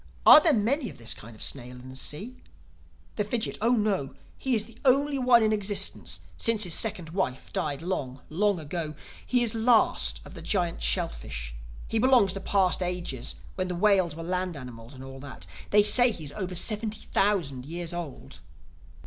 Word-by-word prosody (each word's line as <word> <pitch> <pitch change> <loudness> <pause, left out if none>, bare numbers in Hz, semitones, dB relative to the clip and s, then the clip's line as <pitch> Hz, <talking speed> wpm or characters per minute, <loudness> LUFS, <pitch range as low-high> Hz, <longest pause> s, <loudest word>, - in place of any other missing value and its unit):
Are - - +11
there 320 - +4
many 245 +2 0
of - - -12
this 115 -1 -3
kind 115 +1 -12
of - - -6
snail 125 -2 -3
in 130 +1 -12
the 130 - -10
sea?" 200 - -5 0.8
The 210 - +1
Fidgit: 220 +2 -2
"Oh 235 +3 +3
no. 205 - 0 0.2
He 260 -2 0
is 215 - +1
the 230 +1 -16
only 275 +1 +3
one 245 -2 +5
in 215 0 +2
existence, 205 -1 0 0.2
since 225 -2 +3
his 175 -4 -1
second 185 -7 +1
wife 165 -8 -3
died 145 0 -2
long, 140 -8 -3
long 200 +3 +1
ago. 155 0 -4 0.3
He 250 -1 +2
is 230 - 0
the 225 - -4
last 230 0 +3
of - - -12
the - - -9
Giant 175 -5 -1
Shellfish. - - -2 0.3
He 225 - -1
belongs 240 -6 +4
to 195 - -5
past 190 -1 +1
ages 175 -9 -2 0.2
when 185 -1 -2
the 180 - -3
whales 185 -4 +2
were 165 - -7
land 180 -1 -2
animals 125 -1 -10
and 130 - -10
all 135 0 -10
that. 130 - -10 0.2
They 210 0 +5
say 245 +4 +5
he 180 -8 -6
is 145 - -5
over 185 +1 -5
seventy 215 +3 -1
thousand 150 -11 0
years 170 +1 -5
old." 170 -6 -7
185 Hz, 190 wpm, -27 LUFS, 145-220 Hz, 0.8 s, Are